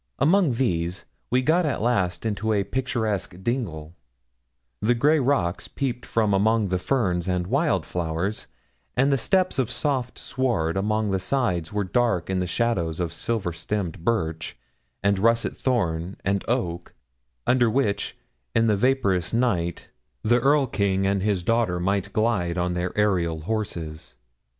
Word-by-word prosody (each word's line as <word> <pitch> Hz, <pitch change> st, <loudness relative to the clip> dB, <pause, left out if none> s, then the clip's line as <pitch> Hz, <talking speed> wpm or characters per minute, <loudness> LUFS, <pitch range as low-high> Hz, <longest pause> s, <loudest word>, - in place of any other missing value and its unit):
Among 170 Hz, -3 st, +3 dB
these, 90 Hz, -7 st, -1 dB, 0.2 s
we 125 Hz, +2 st, +2 dB
got 165 Hz, +6 st, +3 dB
at 150 Hz, -5 st, -1 dB
last 100 Hz, -5 st, 0 dB
into 110 Hz, 0 st, 0 dB
a 100 Hz, -2 st, +2 dB
picturesque 110 Hz, -7 st, -2 dB
dingle; 85 Hz, -, -3 dB, 0.9 s
the 120 Hz, +3 st, +3 dB
grey 150 Hz, +6 st, +4 dB
rocks 125 Hz, -10 st, 0 dB
peeped 125 Hz, -3 st, -3 dB
from 110 Hz, -3 st, +1 dB
among 105 Hz, +1 st, +2 dB
the 90 Hz, 0 st, 0 dB
ferns 90 Hz, -6 st, 0 dB
and 90 Hz, -1 st, 0 dB
wild 140 Hz, -, +1 dB
flowers, 90 Hz, +4 st, -3 dB, 0.5 s
and 135 Hz, +3 st, +4 dB
the 135 Hz, -, +3 dB
steps 185 Hz, -, +1 dB
of 125 Hz, -, +1 dB
soft 125 Hz, -1 st, -1 dB
sward 115 Hz, -12 st, -1 dB
along 105 Hz, +1 st, 0 dB
its 95 Hz, -1 st, -1 dB
sides 95 Hz, -12 st, 0 dB
were 105 Hz, 0 st, 0 dB
dark 100 Hz, -3 st, 0 dB
in 95 Hz, -, 0 dB
the 90 Hz, -, -1 dB
shadows 90 Hz, -6 st, 0 dB
of 85 Hz, -2 st, -2 dB
silver 95 Hz, -1 st, -2 dB
stemmed 85 Hz, 0 st, -3 dB
birch, 80 Hz, -8 st, -1 dB, 0.5 s
and 100 Hz, -1 st, +2 dB
russet 115 Hz, +2 st, +2 dB
thorn, 90 Hz, -8 st, -1 dB
and 100 Hz, +1 st, +1 dB
oak, 90 Hz, -9 st, -2 dB, 0.5 s
under 125 Hz, -2 st, +4 dB
which, 110 Hz, -4 st, 0 dB, 0.4 s
in 115 Hz, -, +4 dB
the 110 Hz, -2 st, +3 dB
vaporous 100 Hz, -6 st, +1 dB
night, 95 Hz, -9 st, 0 dB, 0.3 s
the 120 Hz, +3 st, +4 dB
Erl 140 Hz, +3 st, +4 dB
king 100 Hz, -5 st, 0 dB
and 100 Hz, 0 st, +1 dB
his 100 Hz, -3 st, 0 dB
daughter 115 Hz, -4 st, +1 dB
might 95 Hz, +2 st, 0 dB
glide 100 Hz, -6 st, 0 dB
on 90 Hz, 0 st, 0 dB
their 90 Hz, +1 st, -1 dB
aërial 85 Hz, -7 st, +1 dB
horses. 85 Hz, -, -4 dB
105 Hz, 150 wpm, -25 LUFS, 90-120 Hz, 0.9 s, grey